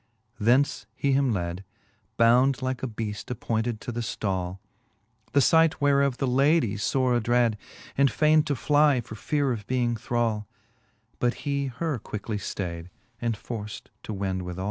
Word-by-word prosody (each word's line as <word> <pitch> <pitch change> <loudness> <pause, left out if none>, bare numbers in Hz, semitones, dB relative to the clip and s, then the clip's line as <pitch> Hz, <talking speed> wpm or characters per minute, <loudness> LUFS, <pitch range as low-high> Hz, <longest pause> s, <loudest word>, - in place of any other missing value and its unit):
Thence 120 0 +2
he 140 - 0
him 135 -1 +3
lad. 90 -2 -3 0.5
Bound 125 +3 +4
like 130 -1 -2
a 130 - -1
beaft 105 -3 -5
appointed 115 -2 -2
to - - -5
the 120 - -4
ftall: 95 -5 -2 0.8
The 140 - +5
fight 160 +4 +4
whereof 140 -2 +3
the 135 - 0
lady 135 -2 +3
ibre 125 +4 +1
adrad, 120 0 +3 0.4
And 140 0 +4
fain'd 155 0 +3
to'fly 145 -1 +3
for 110 - -10
feare 140 +5 0
of 105 -4 -4
being 120 -2 +1
thrall; 110 -2 -1 0.7
But 120 0 +1
he 140 -1 0
her 140 +2 -3
quickly 105 0 -5
ftayd, 85 -4 -5 0.3
and 115 -2 -1
for 110 -1 -5
ft 105 - -9
to - - -7
wend 95 -2 -2
withall. 90 0 -6
120 Hz, 155 wpm, -26 LUFS, 105-140 Hz, 0.8 s, The